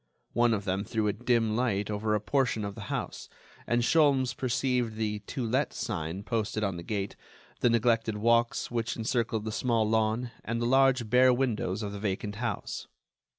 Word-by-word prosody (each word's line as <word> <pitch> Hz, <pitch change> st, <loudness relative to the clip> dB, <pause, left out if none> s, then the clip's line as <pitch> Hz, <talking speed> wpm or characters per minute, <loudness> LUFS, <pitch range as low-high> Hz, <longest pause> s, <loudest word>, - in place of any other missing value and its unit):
One 120 Hz, -1 st, +3 dB
of 100 Hz, -1 st, -5 dB
them 95 Hz, +1 st, -1 dB
threw 110 Hz, -1 st, -1 dB
a 105 Hz, -, +1 dB
dim 115 Hz, -2 st, +1 dB
light 110 Hz, -4 st, 0 dB
over 105 Hz, +1 st, 0 dB
a -, -, +1 dB
portion 115 Hz, -1 st, 0 dB
of 100 Hz, -, -4 dB
the -, -, -8 dB
house, -, -, -4 dB, 0.4 s
and 120 Hz, 0 st, +2 dB
Sholmes 140 Hz, -3 st, +3 dB
perceived 125 Hz, -2 st, 0 dB
the 105 Hz, -1 st, -2 dB
"To 120 Hz, +4 st, -5 dB
let" 130 Hz, +6 st, 0 dB
sign 95 Hz, -5 st, -4 dB
posted 110 Hz, -1 st, -1 dB
on 95 Hz, -4 st, -1 dB
the -, -, -6 dB
gate, 100 Hz, +2 st, -3 dB, 0.4 s
the 120 Hz, -, +3 dB
neglected 115 Hz, -2 st, +2 dB
walks 115 Hz, +3 st, +2 dB
which 115 Hz, -1 st, -2 dB
encircled 115 Hz, -1 st, -1 dB
the 110 Hz, -, -2 dB
small 115 Hz, -1 st, +1 dB
lawn, 110 Hz, +2 st, +1 dB
and 115 Hz, +1 st, -2 dB
the 120 Hz, -, 0 dB
large 130 Hz, -1 st, +4 dB
bare 125 Hz, +3 st, +5 dB
windows 115 Hz, -6 st, 0 dB
of 100 Hz, -, -3 dB
the 100 Hz, -, -6 dB
vacant 100 Hz, 0 st, -3 dB
house. 120 Hz, +1 st, -4 dB
115 Hz, 185 wpm, -29 LUFS, 105-125 Hz, 0.4 s, bare